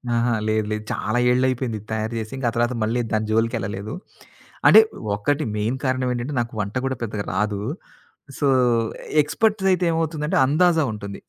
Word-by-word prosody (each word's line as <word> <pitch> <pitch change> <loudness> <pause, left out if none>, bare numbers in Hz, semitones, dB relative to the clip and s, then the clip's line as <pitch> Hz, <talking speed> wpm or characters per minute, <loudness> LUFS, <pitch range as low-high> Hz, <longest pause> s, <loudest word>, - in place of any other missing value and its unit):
అహా! 120 0 +2
లేదు, 110 0 +1
లేదు. 110 0 -2
చాలా 110 +3 -1
ఏళ్లైయిపోయింది 125 -2 0
ఇది 105 - -18
తయారు 110 +1 -2
చేసి, 110 -1 -6
ఇంకా 130 -3 -1
ఆ - - -15
తర్వాత 120 +1 +1
మళ్ళీ 115 +3 0
దాని 110 0 0
జోలికేళ్ళలేదు. 110 -3 -1 0.7
అంటే - - +10 0.4
ఒకటి 145 +9 0
మెయిన్ 110 +5 -1
కారణమేంటంటే 130 +1 -1
నాకు 115 - -5
వంట 100 +3 -5
కూడా 130 0 -1
పెద్దగా 105 -2 -4
రాదు. 105 -1 -1 0.8
సో, 145 - +2 0.7
ఎక్స్‌పర్ట్స్ 195 +6 0
అయితే 180 -1 +1
ఏమవుతుందంటే 160 -2 -1
అందాజ 165 +4 +3 0.2
ఉంటుంది. 100 -2 -7
120 Hz, 155 wpm, -22 LUFS, 110-140 Hz, 0.8 s, అంటే